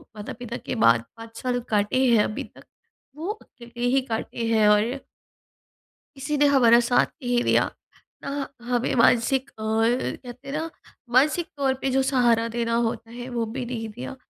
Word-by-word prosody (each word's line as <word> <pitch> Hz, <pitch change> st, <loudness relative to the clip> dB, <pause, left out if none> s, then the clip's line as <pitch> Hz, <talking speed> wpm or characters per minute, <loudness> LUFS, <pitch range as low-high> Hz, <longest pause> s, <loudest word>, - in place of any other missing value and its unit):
माता-पिता 235 Hz, +3 st, -6 dB
के -, -, -3 dB
बाद 115 Hz, 0 st, +5 dB
5 225 Hz, 0 st, -11 dB
साल 250 Hz, -1 st, 0 dB
काटे 215 Hz, +5 st, +2 dB
हैं 230 Hz, -4 st, +5 dB
अभी 215 Hz, -, -3 dB
तक, -, -, -16 dB, 0.5 s
वो 320 Hz, +4 st, -6 dB
अकेले 240 Hz, -, -8 dB
ही 270 Hz, -, +4 dB
काटे 230 Hz, +1 st, -3 dB
हैं 220 Hz, -2 st, +3 dB
और 220 Hz, +6 st, +2 dB, 1.2 s
किसी 290 Hz, +2 st, -2 dB
ने 290 Hz, -, +5 dB
हमारा 245 Hz, -5 st, +6 dB
साथ 245 Hz, +1 st, +3 dB, 0.2 s
नहीं 245 Hz, -1 st, +1 dB
दिया, -, -, +3 dB, 0.5 s
ना 280 Hz, 0 st, -4 dB, 0.2 s
हमें 245 Hz, 0 st, +1 dB
मानसिक 250 Hz, +3 st, +3 dB
अ, 220 Hz, -, -12 dB
कहते 240 Hz, +3 st, -1 dB
हैं -, -, -5 dB
ना 320 Hz, +2 st, -3 dB, 0.4 s
मानसिक 305 Hz, +6 st, +3 dB
तौर 270 Hz, -2 st, +1 dB
पे 270 Hz, -, 0 dB
जो 265 Hz, +1 st, +2 dB
सहारा 240 Hz, -4 st, +2 dB
देना 230 Hz, -1 st, 0 dB
होता 225 Hz, 0 st, -5 dB
है 245 Hz, +1 st, -8 dB
वो 235 Hz, -1 st, -1 dB
भी 260 Hz, -1 st, -3 dB
नहीं 230 Hz, -2 st, -4 dB
दिया। 240 Hz, +4 st, -8 dB
240 Hz, 170 wpm, -24 LUFS, 230-265 Hz, 1.2 s, हमारा